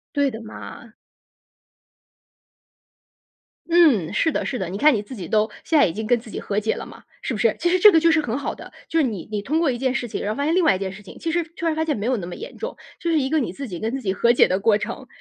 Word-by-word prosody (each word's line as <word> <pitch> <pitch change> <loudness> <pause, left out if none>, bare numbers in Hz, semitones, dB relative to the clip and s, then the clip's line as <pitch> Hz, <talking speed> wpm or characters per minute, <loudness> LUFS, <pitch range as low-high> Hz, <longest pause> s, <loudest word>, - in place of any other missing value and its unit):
对 285 -1 +2
的 225 - -8
嘛。 220 -1 -10 2.8
嗯， 290 - +4
是 320 +9 +2
的， - - -2
是 255 - -3
的。 185 - -3
你 185 - -5
看 295 +6 +5
你 215 - 0
自 230 +5 -10
己 185 -5 -6
都 215 +4 +1
现 320 - +3
在 - - +6
已 170 - -2
经 215 +5 -5
跟 240 +1 +2
自 225 - -13
己 - - -5
和 205 +1 -2
解 220 +1 0
了 - - -6
嘛， - - -14 0.2
是 - - -2
不 220 - -3
是？ 220 +1 +2
其 345 +2 +1
实 370 - +3
这 420 +3 +9
个 325 - +6
就 335 +1 +4
是 325 - +4
很 245 -5 -2
好 280 - -3
的， - - -12 0.2
就 330 - 0
是 - - +5
你 210 -8 -5
你 210 -1 -2
通 290 +10 -1
过 325 -4 +2
一 245 - -3
件 260 0 0
事 245 - -2
情， 230 - -5
然 205 - -2
后 - - -10
发 280 - -1
现 315 +3 +1
另 370 - +3
外 255 - +4
一 - - -5
件 190 -1 -4
事 205 +2 -11
情， 195 - -12
其 330 - -3
实 345 +1 +1
突 - - -6
然 320 - +2
发 315 - -1
现 310 -2 -1
没 205 - -4
有 250 0 +1
那 175 - -5
么 175 - -6
严 - - -9
重， 475 - -5 0.2
就 340 - -1
是 320 - +3
一 265 -1 -1
个 315 - +2
你 230 -10 -2
自 275 +8 -6
己 180 -7 -6
跟 220 - -1
自 270 - -4
己 190 -4 0
和 235 +5 +3
解 - - +6
的 185 +2 0
过 215 0 +4
程， - - -5
240 Hz, 330 characters per minute, -22 LUFS, 210-315 Hz, 2.8 s, 这